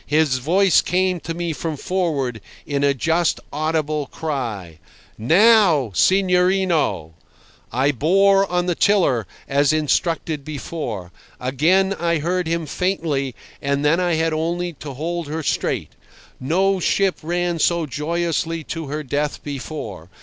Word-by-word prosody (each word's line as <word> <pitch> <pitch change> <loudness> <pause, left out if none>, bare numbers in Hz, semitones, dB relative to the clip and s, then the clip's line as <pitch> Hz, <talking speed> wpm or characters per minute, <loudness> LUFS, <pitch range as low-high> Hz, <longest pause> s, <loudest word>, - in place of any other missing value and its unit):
His 150 -3 +2
voice 185 +8 +4
came 185 0 0
to 165 0 -5
me 170 -1 -2
from 155 0 -4
forward, 140 - -2 0.2
in 140 -1 -1
a 140 -1 +3
just 165 +4 +1
audible 155 -1 -1
cry: 115 - -5 0.4
"Now, 170 - +4
signorino!" 180 - +2 0.6
I 135 +3 +2
bore 195 - +3
on 180 0 +1
the 180 - +1
tiller, 165 - +2 0.2
as 140 +1 +3
instructed 155 0 0
before. 135 - -5 0.3
Again 165 +10 +2
I 170 -3 0
heard 175 +3 -1
him 165 0 -1
faintly, 155 -7 -1 0.3
and 140 +1 0
then 160 +4 +3
I 175 -2 +1
had 160 0 0
only 170 +2 -2
to 145 -2 -7
hold 170 +3 -3
her 160 +2 -4
straight. - - -1 0.5
No 185 +8 +1
ship 195 +1 +1
ran 175 +1 -1
so 170 +1 +2
joyously 165 +2 -2
to 165 0 -5
her 150 +2 -4
death 145 +2 -2
before. 130 - -6
160 Hz, 135 wpm, -21 LUFS, 140-175 Hz, 0.6 s, voice